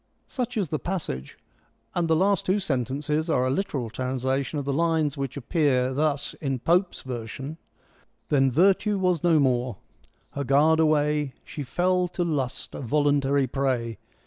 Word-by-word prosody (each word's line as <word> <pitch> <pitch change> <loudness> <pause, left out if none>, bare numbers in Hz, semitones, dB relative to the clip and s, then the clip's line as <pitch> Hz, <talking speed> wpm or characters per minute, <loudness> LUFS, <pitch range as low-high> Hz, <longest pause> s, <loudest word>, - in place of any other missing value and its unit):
Such 245 -3 -4
is 195 -7 0
the 155 - -1
passage, 155 - -4 0.6
and 175 -1 0
the 160 - +3
last 195 +3 +2
two 190 +2 +3
sentences 150 - -1
are 130 -5 +2
a 130 - +1
literal 135 - -2
translation 130 +3 -2
of 140 - -3
the 140 - -1
lines 160 -1 +1
which 140 -1 -4
appear 130 -2 +1
thus 145 0 0
in 135 -3 -1
Pope's 175 +8 +1
version: 130 +5 -6 0.7
Then 135 -2 +4
virtue 195 - +3
was 180 -4 +1
no 165 -3 +4
more: 125 -5 +1 0.5
her 140 - -3
guard 150 +4 +4
away, 150 -3 +2
She 150 - -7
fell, 180 +6 +1
to 175 0 -2
lust 145 -7 -2
a - - -6
voluntary 140 0 +2
prey. 125 -4 -1
145 Hz, 155 wpm, -26 LUFS, 130-165 Hz, 0.7 s, Then